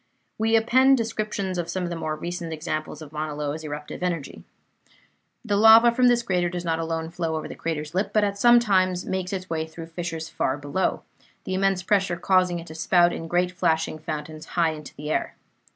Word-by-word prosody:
We 225 Hz, +1 st, +2 dB
append 260 Hz, +4 st, +5 dB
descriptions 215 Hz, -5 st, -2 dB
of 170 Hz, -, -3 dB
some 185 Hz, -, -2 dB
of 175 Hz, -, -3 dB
the -, -, -3 dB
more 155 Hz, -2 st, -3 dB
recent 175 Hz, +1 st, -5 dB
examples 155 Hz, 0 st, -4 dB
of 145 Hz, -, -12 dB
Mauna 155 Hz, -1 st, -4 dB
Loa's 150 Hz, +1 st, -3 dB
eruptive 150 Hz, +1 st, -6 dB
energy. 170 Hz, -6 st, -3 dB, 1.0 s
The 205 Hz, -3 st, 0 dB
lava 225 Hz, +2 st, +8 dB
from 250 Hz, +1 st, +3 dB
this 240 Hz, -1 st, +3 dB
crater 180 Hz, -5 st, 0 dB
does 175 Hz, 0 st, -5 dB
not 165 Hz, -1 st, 0 dB
alone 165 Hz, 0 st, -3 dB
flow 165 Hz, -2 st, -2 dB
over 155 Hz, -, -4 dB
the -, -, -7 dB
crater's 155 Hz, -2 st, -4 dB
lip, 190 Hz, +3 st, 0 dB
but 215 Hz, -, +3 dB
at 200 Hz, 0 st, -1 dB, 0.2 s
times 185 Hz, -4 st, +1 dB
makes 185 Hz, -1 st, -3 dB
its 185 Hz, -2 st, -4 dB
way 160 Hz, -2 st, -2 dB
through 160 Hz, +1 st, -9 dB
fissures 165 Hz, -1 st, -5 dB
far 135 Hz, -3 st, -1 dB
below, 145 Hz, +6 st, -1 dB, 0.4 s
the 190 Hz, -, -4 dB
immense 190 Hz, -1 st, +1 dB
pressure 190 Hz, -2 st, +1 dB
causing 180 Hz, 0 st, +2 dB
it 170 Hz, -, -7 dB
to 160 Hz, -, -10 dB
spout 175 Hz, +2 st, +3 dB
in 165 Hz, -, -5 dB
great 180 Hz, +1 st, +1 dB
flashing 160 Hz, -3 st, 0 dB
fountains 155 Hz, 0 st, -6 dB
high 165 Hz, -2 st, +3 dB
into 150 Hz, -2 st, -9 dB
the 150 Hz, +1 st, -5 dB
air. -, -, -1 dB
175 Hz, 200 wpm, -25 LUFS, 160-190 Hz, 1.0 s, lava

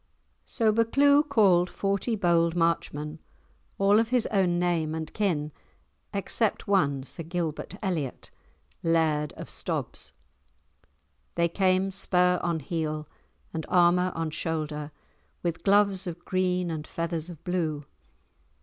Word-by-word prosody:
So 225 Hz, -3 st, +2 dB
Buccleuch 280 Hz, +7 st, +4 dB
called 185 Hz, -8 st, +4 dB
forty 200 Hz, +4 st, -1 dB
bold 170 Hz, -4 st, +2 dB
Marchmen, 160 Hz, -2 st, -1 dB, 0.6 s
all 200 Hz, +2 st, +4 dB
of 225 Hz, 0 st, +1 dB
his 250 Hz, -2 st, +2 dB
own 185 Hz, -4 st, +2 dB
name 170 Hz, -3 st, 0 dB
and 160 Hz, -1 st, -5 dB
kin 160 Hz, -8 st, 0 dB, 0.6 s
except 205 Hz, +2 st, -1 dB
one, 140 Hz, -9 st, +2 dB
Sir 145 Hz, -, -6 dB
Gilbert 165 Hz, 0 st, -4 dB
Elliot, 160 Hz, -10 st, -3 dB, 0.5 s
Laird 160 Hz, -3 st, +1 dB
of -, -, -9 dB
Stobs. -, -, -4 dB, 1.2 s
They 170 Hz, -, +3 dB
came 190 Hz, +2 st, +1 dB
spur 180 Hz, -2 st, +2 dB
on 170 Hz, -2 st, -1 dB
heel 155 Hz, 0 st, -3 dB, 0.5 s
and 160 Hz, -, -3 dB
armour 180 Hz, +1 st, +4 dB
on 165 Hz, -1 st, -2 dB
shoulder, 155 Hz, -2 st, -3 dB, 0.5 s
with 170 Hz, -1 st, -2 dB
gloves 200 Hz, -1 st, +3 dB
of 175 Hz, 0 st, -7 dB
green 180 Hz, -1 st, 0 dB
and 155 Hz, -1 st, -5 dB
feathers 165 Hz, 0 st, -3 dB
of 165 Hz, -2 st, -11 dB
blue. 160 Hz, -5 st, -2 dB
175 Hz, 120 wpm, -27 LUFS, 160-195 Hz, 1.2 s, Buccleuch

